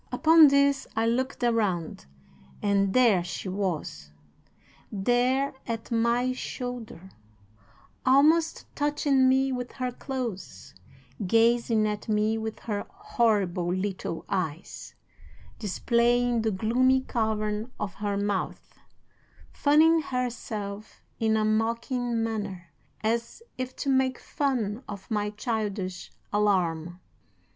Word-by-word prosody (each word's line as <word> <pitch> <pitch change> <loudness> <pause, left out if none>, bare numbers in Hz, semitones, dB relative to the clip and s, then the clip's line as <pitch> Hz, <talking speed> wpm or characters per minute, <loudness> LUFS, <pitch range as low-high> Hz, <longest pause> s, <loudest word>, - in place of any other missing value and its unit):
"'Upon 320 -1 +7
this, 280 0 +3
I 225 +1 +1
looked 255 +3 -1
around 205 - 0 0.5
and 200 -1 +2
there 220 -6 +4
she 185 +2 -5
was! 175 - -3 0.8
There 245 +6 +1
at 230 0 -5
my 235 +2 +2
shoulder, 245 -8 -6 0.9
almost 310 +5 +3
touching 290 -3 +2
me 265 +1 +3
with 250 -1 -4
her 255 -1 -3
clothes, 235 - -6 0.5
gazing 230 +1 +3
at 210 +1 -4
me 215 +1 +2
with 220 0 -5
her 205 -3 -4
horrible 210 - 0
little 185 -3 -3
eyes, 175 -4 -4 0.6
displaying 235 +3 +1
the 220 - +1
gloomy 245 +6 +2
cavern 220 -1 -2
of 210 -2 -3
her 205 -1 -2
mouth, 200 -1 -3 0.7
fanning 320 +3 +4
herself 220 -6 -5 0.2
in 220 -1 +2
a 215 - +1
mocking 230 +2 0
manner, 200 -7 -4 0.3
as 230 - -2
if 255 0 -5
to 280 - -3
make 260 -1 +2
fun 245 -6 -2
of 200 +1 -9
my 210 -1 0
childish 210 -4 -3 0.2
alarm. 175 -5 +1
225 Hz, 105 wpm, -27 LUFS, 205-255 Hz, 0.9 s, Upon